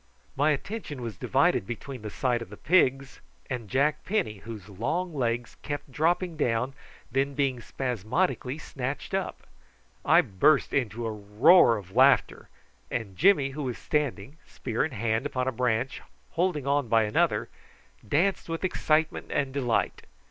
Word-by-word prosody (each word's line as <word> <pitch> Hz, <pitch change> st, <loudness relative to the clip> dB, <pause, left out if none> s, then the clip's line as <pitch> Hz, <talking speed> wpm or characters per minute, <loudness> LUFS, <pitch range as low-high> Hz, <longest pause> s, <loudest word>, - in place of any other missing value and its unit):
My 145 Hz, +3 st, +3 dB
attention 150 Hz, -, -3 dB
was 115 Hz, -4 st, -5 dB
divided 135 Hz, -, +1 dB
between 125 Hz, +2 st, -6 dB
the 105 Hz, -, -5 dB
sight 120 Hz, +2 st, 0 dB
of 115 Hz, -, -8 dB
the -, -, -10 dB
pigs 135 Hz, -5 st, +2 dB, 0.3 s
and 120 Hz, -5 st, -4 dB
Jack 140 Hz, +5 st, +1 dB
Penny, 110 Hz, -, -1 dB
whose 105 Hz, -3 st, -9 dB
long 160 Hz, -, -2 dB
legs 120 Hz, -4 st, -2 dB
kept 145 Hz, -2 st, -5 dB
dropping 165 Hz, +4 st, 0 dB
down, 115 Hz, -5 st, +1 dB
and 135 Hz, +2 st, -7 dB, 0.4 s
then 135 Hz, +2 st, 0 dB
being 135 Hz, -3 st, 0 dB
spasmodically 125 Hz, -, -2 dB
snatched 135 Hz, +1 st, -5 dB
up. 190 Hz, -1 st, -3 dB, 0.6 s
I -, -, +6 dB
burst 120 Hz, +11 st, +2 dB
into 120 Hz, -3 st, -1 dB
a 110 Hz, -, -1 dB
roar 110 Hz, -, +5 dB
of 95 Hz, -1 st, -11 dB
laughter, 135 Hz, +1 st, +4 dB, 0.4 s
and 100 Hz, -5 st, -4 dB
Jimmy, 150 Hz, -, +4 dB
who 150 Hz, +2 st, -5 dB
was 125 Hz, -4 st, -3 dB
standing, 145 Hz, -3 st, -2 dB
spear -, -, -2 dB
in -, -, -1 dB
hand, 115 Hz, +3 st, 0 dB
upon 130 Hz, -2 st, -2 dB
a -, -, +1 dB
branch, 125 Hz, +1 st, -1 dB, 0.3 s
holding 165 Hz, -5 st, 0 dB
on 140 Hz, -2 st, +1 dB
by 115 Hz, 0 st, +4 dB
another, 105 Hz, 0 st, +1 dB, 0.5 s
danced 170 Hz, -, 0 dB
with 165 Hz, +2 st, -3 dB
excitement 160 Hz, -3 st, +1 dB
and 135 Hz, -2 st, -1 dB
delight. 125 Hz, -5 st, 0 dB
130 Hz, 155 wpm, -27 LUFS, 115-150 Hz, 0.6 s, I